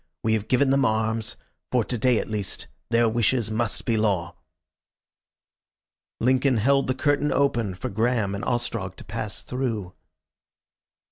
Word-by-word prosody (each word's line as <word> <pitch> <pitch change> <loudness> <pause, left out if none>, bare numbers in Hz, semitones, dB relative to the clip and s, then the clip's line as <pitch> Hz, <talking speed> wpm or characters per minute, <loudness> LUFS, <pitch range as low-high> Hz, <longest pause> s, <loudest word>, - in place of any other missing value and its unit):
"We 110 - +2
have 110 -1 -1
given 130 +3 +3
them 135 0 +3
arms. 110 0 0 0.3
For 125 -2 +3
to 125 - -3
day 120 +1 +3
at - - -2
least 105 -3 -3 0.2
their 115 0 +4
wishes 115 0 +1
must 115 +1 -1
be 115 -2 +1
law." 100 -6 0 1.8
Lincoln 130 +1 +3
held 135 +5 +3
the 130 - 0
curtain 145 +1 +1
open 120 -9 +1
for 90 - -4
Graham 110 -1 0
and 100 +3 -4
Ostrog 115 -6 -2
to - - -11
pass 110 -1 -5
through.... 115 -8 -3
115 Hz, 145 wpm, -25 LUFS, 110-125 Hz, 1.8 s, their